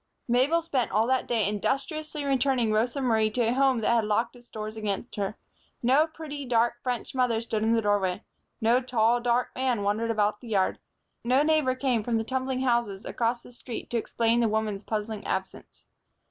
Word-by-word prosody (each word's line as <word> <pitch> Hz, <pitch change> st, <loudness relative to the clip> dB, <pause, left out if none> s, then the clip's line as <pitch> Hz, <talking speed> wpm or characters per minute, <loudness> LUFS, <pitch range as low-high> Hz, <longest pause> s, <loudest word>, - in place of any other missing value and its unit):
Mabel 265 Hz, +8 st, +3 dB
spent 270 Hz, -8 st, 0 dB
all 215 Hz, +3 st, +2 dB
that 260 Hz, +1 st, +1 dB
day 230 Hz, -4 st, +1 dB
industriously 290 Hz, -, -2 dB
returning 265 Hz, -4 st, +2 dB
Rosa 235 Hz, +6 st, +1 dB
Marie 220 Hz, -4 st, +2 dB
to 230 Hz, +1 st, 0 dB
a -, -, +1 dB
home 265 Hz, -2 st, +3 dB
that 230 Hz, -, +2 dB
had 230 Hz, -1 st, +3 dB
locked 215 Hz, +4 st, 0 dB
its 240 Hz, 0 st, -17 dB
doors 215 Hz, 0 st, -6 dB
against 215 Hz, +1 st, -4 dB
her. 205 Hz, +1 st, -2 dB, 0.5 s
No 270 Hz, +6 st, +4 dB
pretty, 310 Hz, -3 st, -7 dB
dark, 240 Hz, -1 st, +1 dB
French 250 Hz, -2 st, -3 dB
mother 250 Hz, -3 st, +1 dB
stood 225 Hz, -2 st, -3 dB
in 225 Hz, +1 st, +3 dB
the 225 Hz, -, +1 dB
doorway. 205 Hz, -1 st, +1 dB, 0.4 s
No 235 Hz, +2 st, +3 dB
tall, 240 Hz, -1 st, +2 dB
dark 245 Hz, +1 st, +1 dB
man 255 Hz, -5 st, 0 dB
wandered 215 Hz, +3 st, 0 dB
about 210 Hz, -1 st, +1 dB
the 240 Hz, -, -11 dB
yard. 195 Hz, -4 st, +1 dB, 0.4 s
No 255 Hz, +4 st, +3 dB
neighbor 305 Hz, -4 st, +2 dB
came 255 Hz, -4 st, +1 dB
from 230 Hz, +1 st, 0 dB
the 225 Hz, -, 0 dB
tumbling 260 Hz, +1 st, -2 dB
houses 235 Hz, -5 st, 0 dB
across 235 Hz, 0 st, -1 dB
the -, -, -14 dB
street 240 Hz, -1 st, -8 dB
to 240 Hz, -, +1 dB
explain 230 Hz, +1 st, +1 dB
the 230 Hz, -2 st, +2 dB
woman's 215 Hz, -2 st, -1 dB
puzzling 215 Hz, 0 st, -4 dB
absence. 190 Hz, 0 st, -5 dB
235 Hz, 190 wpm, -27 LUFS, 220-255 Hz, 0.5 s, No